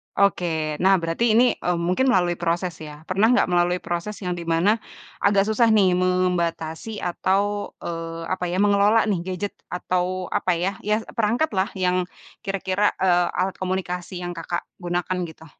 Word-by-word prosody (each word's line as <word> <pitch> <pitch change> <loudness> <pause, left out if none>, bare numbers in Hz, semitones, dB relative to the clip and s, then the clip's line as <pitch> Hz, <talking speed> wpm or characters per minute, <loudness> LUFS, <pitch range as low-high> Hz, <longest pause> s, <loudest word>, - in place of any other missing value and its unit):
Oke. 160 -6 +1
Nah 190 +1 +5
berarti 185 +6 +1
ini, 235 - +6 0.2
eee, 180 - 0
mungkin 180 +10 +1
melalui 175 -6 +2
proses 175 +1 0
ya? 150 -1 -10
pernah 195 +6 +2
nggak 245 -6 +3
melalui 175 0 +2
proses 175 +5 -3
yang 180 - -2
di 170 -1 -5
mana, 185 +7 +2 0.4
agak 200 -1 +3
susah 220 +3 +2
nih 195 -3 +5
membatasi 180 +1 -1
atau 200 +3 0
eee, 165 0 -5
apa 185 -1 -1
ya, 175 - -2
mengelola 205 +2 +4
nih 205 -5 0
gadget, 190 +2 -3 0.2
atau 180 +1 -2
apa 180 - +1
ya, 180 +3 0 0.2
ya 215 +1 +1
perangkat 235 +8 +1
lah 190 -1 +1
yang 180 -1 +1 0.3
kira-kira, 195 +1 0
eee, 180 -2 +3
alat 185 +1 0
komunikasi 180 -1 -3
yang, 175 - -3
Kakak, 175 0 -4 0.2
gunakan 175 +1 -2
gitu? 160 0 -13
180 Hz, 160 wpm, -23 LUFS, 175-200 Hz, 0.4 s, ini